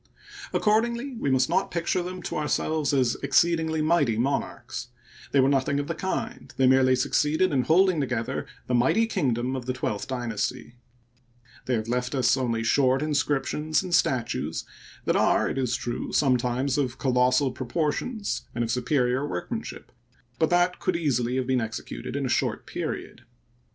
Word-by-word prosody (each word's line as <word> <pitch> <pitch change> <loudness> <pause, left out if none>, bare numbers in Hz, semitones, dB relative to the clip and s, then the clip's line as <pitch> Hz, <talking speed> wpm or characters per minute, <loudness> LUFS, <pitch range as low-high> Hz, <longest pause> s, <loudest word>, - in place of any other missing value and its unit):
Accordingly, 235 +5 +1
we 225 - -2
must 130 -1 +3
not 190 - +1
picture 170 +1 -1
them 180 0 -6
to - - -4
ourselves 155 0 0
as 130 -4 +2
exceedingly 160 +3 +2
mighty 150 -9 +2
monarcns. 125 -1 -2 0.4
They 140 - +3
were 130 - +5
nothing 140 +1 +1
of 145 - -2
the 165 - -3
kind; 190 +3 -4
they 130 - +3
merely 130 0 +5
succeeded 150 +6 +1
in 130 - +3
holding 180 0 +4
together 120 -4 -2 0.2
the 125 - -3
mighty 130 - +3
kingdom 130 - -1
of 130 -1 -6
the 130 - 0
twelfth 110 -5 -3
dynasty. 120 -4 -3 0.9
They 125 - +2
have 110 -1 -3
left 125 +3 -1
us 125 -2 +3
only 115 -4 -1
short 130 +3 +3
inscriptions 150 +2 0
and 180 -2 -5
statues 130 -8 0 0.4
that - - +2
are, - - +3
it - - -2
is 125 -2 0
true, 120 0 -4
sometimes 130 0 +1
of 130 -2 -1
colossal 130 +1 +2
proportions 160 - -2
and 120 - 0
of 115 - -2
superior 125 +2 +1
workmanship; 90 - -5 0.5
but 160 - +3
that 175 +1 +2
could 185 - 0
easily 125 -7 0
have 130 -1 0
been 130 -1 +1
executed 115 +3 -5
in 140 -1 -1
a 125 - +2
short - - -2
period. - - -5
135 Hz, 160 wpm, -26 LUFS, 125-160 Hz, 0.9 s, were